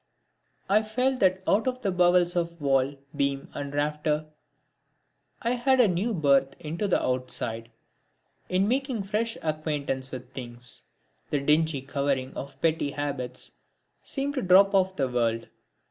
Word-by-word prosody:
I 205 +2 +4
felt 250 +4 0
that 190 0 +3
out 215 +5 +3
of 255 0 -2
the 195 - +1
bowels 180 -1 +3
of 170 -1 -1
wall, 135 -1 +2 0.2
beam 140 -1 -1
and 140 -1 -5
rafter, 150 +1 0 1.2
I 235 - +1
had 260 +2 +2
a 245 - +7
new 190 +6 0
birth 140 -4 +3
into 165 +7 -3
the 185 - +3
outside. 125 -3 -2 0.8
In 185 +2 +2
making 255 -2 0
fresh 220 +3 -1
acquaintance 150 -4 -2
with 130 0 -8
things, 125 -1 -5 0.4
the 145 - +1
dingy 150 0 +2
covering 135 -1 -1
of 140 - -8
petty 160 -3 +1
habits 140 -4 -3 0.5
seemed 280 +1 -2
to 270 - -1
drop 195 +1 +6
off 190 -1 +3
the 135 -5 +1
world. 115 -2 0
155 Hz, 145 wpm, -27 LUFS, 135-195 Hz, 1.2 s, a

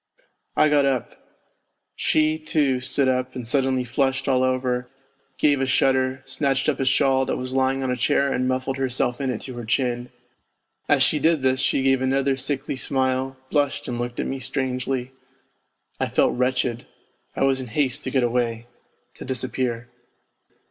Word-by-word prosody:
I - - +5
got 150 -1 +3
up; 130 -4 -1 0.8
she, 155 0 +2
too, 150 -4 +1
stood 130 +1 0
up 130 0 0
and 125 -2 -5
suddenly 130 +1 +1
flushed 135 +3 0
all 130 -2 +3
over, 125 -1 0 0.5
gave 145 -2 +3
a 135 - +1
shudder, 130 0 +1
snatched 135 0 0
up 150 - +1
a 135 - 0
shawl 135 0 +3
that - - -1
was 130 0 -5
lying 135 0 +1
on 130 - -1
a - - 0
chair 140 +2 +1
and 130 0 0
muffled 130 +1 -1
herself 130 -1 -1
in 135 - -1
it 120 -4 -3
to 130 - -7
her 120 -1 -6
chin. 120 +1 -1 0.8
As - - +5
she 150 - +2
did 160 -1 +2
this 130 0 +2
she 135 - +1
gave 135 -1 +3
another 135 +1 +1
sickly 135 +1 -3
smile, 130 0 -1
blushed 145 -2 0
and 120 -1 -3
looked 120 0 -4
at - - -1
me 135 - -3
strangely. 130 0 -2 0.9
I - - 0
felt - - +2
wretched; 125 -1 -1 0.5
I - - 0
was 135 -1 +3
in 130 - -7
haste 135 +3 0
to - - -1
get 130 -1 +1
away 120 -1 -1 0.5
to - - -10
disappear. 125 -2 -2
130 Hz, 175 wpm, -23 LUFS, 125-135 Hz, 0.9 s, I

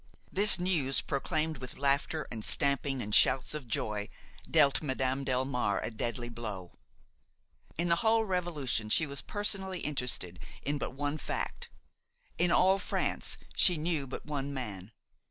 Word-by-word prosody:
This 205 +1 +5
news, 165 -7 +1
proclaimed 155 +1 -2
with 130 -1 -8
laughter 140 +3 0
and 110 -3 -6
stamping 140 0 +2
and 105 0 -5
shouts 130 +6 +5
of 150 -5 -5
joy, 105 -2 -2 0.4
dealt 145 -4 +4
Madame 130 -2 -1
Delmare 125 -5 0
a - - -3
deadly 120 +2 -3
blow. 110 -6 -6 1.1
In 170 +2 0
the 170 0 +3
whole 225 +1 +3
revolution 165 - -1
she 160 - +4
was 140 -1 -5
personally 195 -3 0
interested 125 - -1 0.2
in 145 +1 -1
but - - -4
one 145 +2 -2
fact; - - -4 0.7
in 175 0 +3
all 190 +3 +4
France - - -1 0.2
she 180 -4 +5
knew 155 -3 -1
but 130 - -7
one 145 -2 -3
man. 105 -7 -6
140 Hz, 145 wpm, -31 LUFS, 125-165 Hz, 1.1 s, This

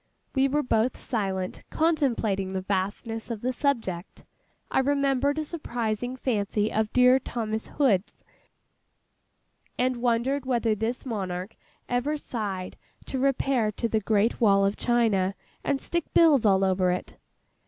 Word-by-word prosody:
We 270 0 +3
were 295 +2 0
both 230 0 +1
silent, 190 -6 -3
contemplating 235 - +1
the 190 -1 -2
vastness 205 +4 -2
of 225 -3 -4
the 255 +1 -1
subject. 225 - -2 0.5
I - - +3
remembered 280 +1 +1
a 310 - 0
surprising 245 -6 -3
fancy 215 -4 -1
of 220 0 0
dear 250 +1 +5
THOMAS 220 -3 -3
HOOD'S, 220 -10 +1 1.5
and 255 0 +1
wondered 245 +3 +1
whether 235 -3 +2
this 225 +5 -3
monarch 190 -3 -4 0.3
ever 255 +5 0
sighed 200 -9 -4 0.3
to 265 - -3
repair 265 -4 +1
to 230 - -1
the 220 -1 +1
great 215 +3 +1
wall 195 -3 +5
of 200 +1 +1
China, 215 -6 +1 0.3
and 275 - 0
stick 340 +2 -2
bills 295 -9 +6
all 195 -1 +4
over 185 -1 +2
it. 180 0 -3
230 Hz, 135 wpm, -26 LUFS, 200-265 Hz, 1.5 s, bills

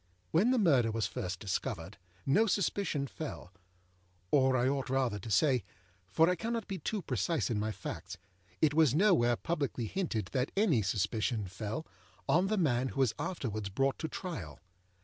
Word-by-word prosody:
When 195 +9 +4
the 260 - +3
murder 140 - +4
was 110 -1 -1
first 90 -1 -4
discovered, 90 -2 -4 0.3
no 210 +11 +4
suspicion 190 -7 0
fellâor 150 - -7 0.8
I 130 -2 +4
ought 135 -1 -1
rather 130 -6 0
to 105 - -8
say, 125 - +3 0.5
for 160 - +4
I 180 - +3
cannot 225 +4 -3
be 190 -2 -4
too 210 -4 -3
precise 130 - 0
in 105 - 0
my 110 +1 -1
facts, - - -7 0.5
it 150 -2 +4
was 150 -4 +4
nowhere 160 - +4
publicly 140 -5 -2
hinted 110 - -2
that 130 -1 0
any 185 - +3
suspicion 105 +3 0
fellâon 100 - -3
the 215 +1 0
man 130 -8 +2
who 135 - -5
was 130 -5 +3
afterwards 110 - -3
brought 135 +7 0
to 160 - -2
trial. 150 - -6
130 Hz, 160 wpm, -32 LUFS, 110-165 Hz, 0.8 s, When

